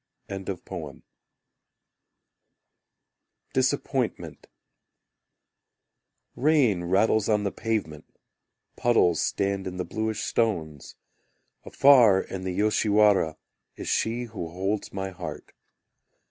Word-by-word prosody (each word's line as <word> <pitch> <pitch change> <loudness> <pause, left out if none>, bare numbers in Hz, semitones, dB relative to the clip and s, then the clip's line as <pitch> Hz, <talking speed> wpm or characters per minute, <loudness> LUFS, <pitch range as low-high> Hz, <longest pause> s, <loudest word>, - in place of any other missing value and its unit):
Disappointment - - -1 1.9
Rain 130 - +2
rattles 105 +4 +2
on 105 -1 +2
the 100 - -1
pavement, 105 -10 -3 0.7
Puddles 105 -8 +2
stand 100 -1 -1
in 90 0 -6
the 90 - -3
bluish 110 -1 -3
stones; 80 -11 -2 0.7
Afar 120 -9 +6
in 95 -1 -7
the 90 -1 -3
Yoshiwara 105 -5 +3 0.4
Is - - -8
she 115 +2 0
who 110 -8 -6
holds 95 +4 -3
my 95 0 -4
heart. 85 -4 -8
100 Hz, 80 wpm, -26 LUFS, 90-110 Hz, 1.9 s, Afar